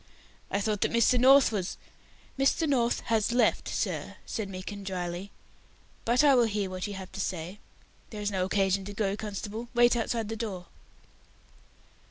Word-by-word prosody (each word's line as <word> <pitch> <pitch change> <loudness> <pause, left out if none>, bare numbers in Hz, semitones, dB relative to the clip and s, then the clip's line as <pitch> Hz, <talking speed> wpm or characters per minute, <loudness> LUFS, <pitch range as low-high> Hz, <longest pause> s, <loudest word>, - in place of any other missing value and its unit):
"I 200 - 0
thought 210 0 -1
that - - +2
Mr. 235 +2 +4
North 270 +1 +7
was 195 -4 -3 0.3
" - - -25
"Mr. 275 +4 +2
North 245 -4 +1
has 225 -1 +1
left, 245 +1 +2
sir," - - -3
said 210 -3 -4
Meekin, 195 +2 -7
dryly, 180 0 -4 0.8
"but 240 +4 +3
I 285 -2 +6
will 245 -2 +5
hear 205 -3 -2
what 185 +1 -4
you 205 - -6
have 190 -1 -8
to 195 - -4
say. 180 +2 -4 0.5
There 215 - -7
is 205 0 -1
no 190 -2 0
occasion 195 0 +1
to 205 - -6
go, 200 -1 -1
constable; 215 +2 -5
wait 240 0 +5
outside 230 -1 -1
the 225 - -4
door." 205 -6 -5
210 Hz, 175 wpm, -28 LUFS, 195-235 Hz, 0.8 s, North